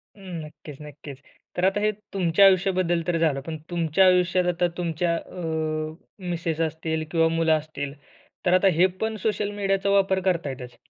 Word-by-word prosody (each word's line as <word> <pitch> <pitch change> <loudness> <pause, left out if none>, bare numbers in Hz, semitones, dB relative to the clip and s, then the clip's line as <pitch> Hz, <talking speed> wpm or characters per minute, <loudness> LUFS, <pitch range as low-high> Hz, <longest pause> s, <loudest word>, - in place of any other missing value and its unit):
हं. 185 -5 -7
नक्कीच, 150 -1 -12
नक्कीच. 145 -2 -10 0.4
तर 175 - -1
आता 195 +2 +2
हे 215 - +2 0.2
तुमच्या 190 0 +4
आयुष्याबद्दल 185 -2 +3
तर 175 - +1
झालं. 155 -4 +1
पण 160 +3 -6
तुमच्या 170 +2 +2
आयुष्यात 180 0 +3
आता 175 0 +1
तुमच्या 170 0 0
अ, 165 - -8 0.9
मिसेस 165 -2 -2
असतील 160 0 -2
किंवा 165 -1 +3
मुलं 165 0 +2
असतील, 145 -2 -6 0.5
तर 175 - +3
आता 185 +2 +5
हे 180 - +6 0.2
पण 220 0 -1
सोशल 210 -1 0
मीडियाचा 195 -1 0
वापर 195 -1 +3
करतायतच. 135 -9 -2
175 Hz, 160 wpm, -25 LUFS, 160-190 Hz, 0.9 s, हे